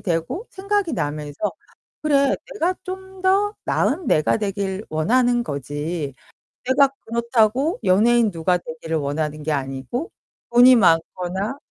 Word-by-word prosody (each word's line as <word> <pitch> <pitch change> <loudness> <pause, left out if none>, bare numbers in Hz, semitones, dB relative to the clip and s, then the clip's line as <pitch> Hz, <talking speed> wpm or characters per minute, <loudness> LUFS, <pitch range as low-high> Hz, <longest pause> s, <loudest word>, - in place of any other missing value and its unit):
되고 175 - -2
생각이 395 -3 -1
나면서 150 +2 -3 0.5
그래 280 -2 +3 0.2
내가 365 -1 0
좀 380 +1 -7
더 400 +2 +2
나은 330 +5 0
내가 155 - +3
되길 200 -1 -3
원하는 240 +10 +2
거지 145 - -4 0.5
내가 265 +2 +4
그렇다고 235 - +1
연예인 225 +3 +4
누가 170 +1 +1
되기를 160 -1 -6
원하는 150 +1 -2
게 155 - -1
아니고 140 - -3 0.4
돈이 250 +1 +8
많거나 185 +5 +1
210 Hz, 260 characters per minute, -22 LUFS, -, 0.5 s, 돈이